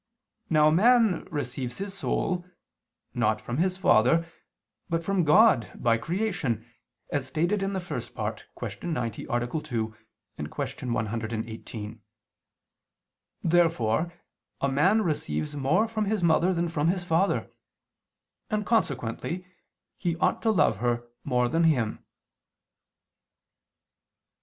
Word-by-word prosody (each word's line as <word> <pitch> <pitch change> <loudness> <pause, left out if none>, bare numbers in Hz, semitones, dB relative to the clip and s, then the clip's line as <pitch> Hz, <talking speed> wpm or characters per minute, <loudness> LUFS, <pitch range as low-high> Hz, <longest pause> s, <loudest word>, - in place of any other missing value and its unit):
Now 155 -1 +5
man 220 +1 +4
receives 130 -4 -4
his 195 0 -5
soul, 180 -2 -1 0.7
not - - +1
from 120 - -4
his 185 +3 +1
father, 165 - +4 0.6
but 165 0 0
from 195 0 +1
God 155 - +5
by 115 -1 +2
creation, 170 - -1 0.5
as 140 -2 -1
stated 170 +9 0
in 195 +1 -1
the 190 - -1
First 175 - -6
Part - - -4
(Q. - - -5
90, 120 -9 -3
A. 120 0 0
2; 120 -6 -3 0.6
Q. 125 - -3
118). 110 -1 -4 1.4
Therefore 165 -3 +2 0.5
a 140 - +1
man 190 +11 +3
receives 80 - -2
more 150 +11 +2
from 220 -1 -1
his 205 -2 0
mother 170 +2 +4
than 170 -1 0
from 160 -2 0
his 180 +1 +1
father: 175 +3 +1 1.0
and 215 -1 -1
consequently 170 - -1 0.5
he 175 -3 0
ought 180 - +1
to 225 - +2
love 165 - +3
her 120 +1 -1 0.2
more 125 -3 +1
than 165 +6 +2
him. 125 -9 +1
160 Hz, 120 wpm, -27 LUFS, 120-185 Hz, 1.4 s, Now